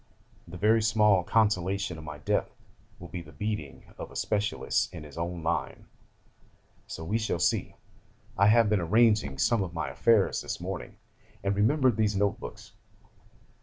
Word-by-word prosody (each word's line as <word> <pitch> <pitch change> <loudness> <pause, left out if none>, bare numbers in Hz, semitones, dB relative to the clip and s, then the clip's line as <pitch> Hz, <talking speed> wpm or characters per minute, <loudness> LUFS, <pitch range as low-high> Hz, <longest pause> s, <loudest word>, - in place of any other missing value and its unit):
The 90 +2 -9
very 110 +4 +3
small 105 -3 +3
consolation 100 -4 0
of - - -10
my 75 -1 -7
death 75 - -1 0.5
will 85 - -11
be 90 - -6
the 75 - -14
beating 90 -3 -4 0.2
of - - -6
a - - -15
specialist 105 0 -1
in 85 -4 -8
his 75 -2 -12
own 85 0 -4
line. 85 +1 -2 1.0
So 80 - -7
we 105 +8 -1
shall 110 -5 -1
see. 90 - 0 0.6
'I 100 - +4
have 115 +1 +5
been 105 -2 +1
arranging 105 - +3
some 115 - +2
of 85 -3 -4
my 75 -4 -2
affairs 105 +8 +2
this - - -5
morning, - - -6 0.5
and 100 0 0
remembered 125 +3 +3
these 105 -2 +1
notebooks. 100 +1 -3
100 Hz, 160 wpm, -28 LUFS, 85-110 Hz, 1.0 s, have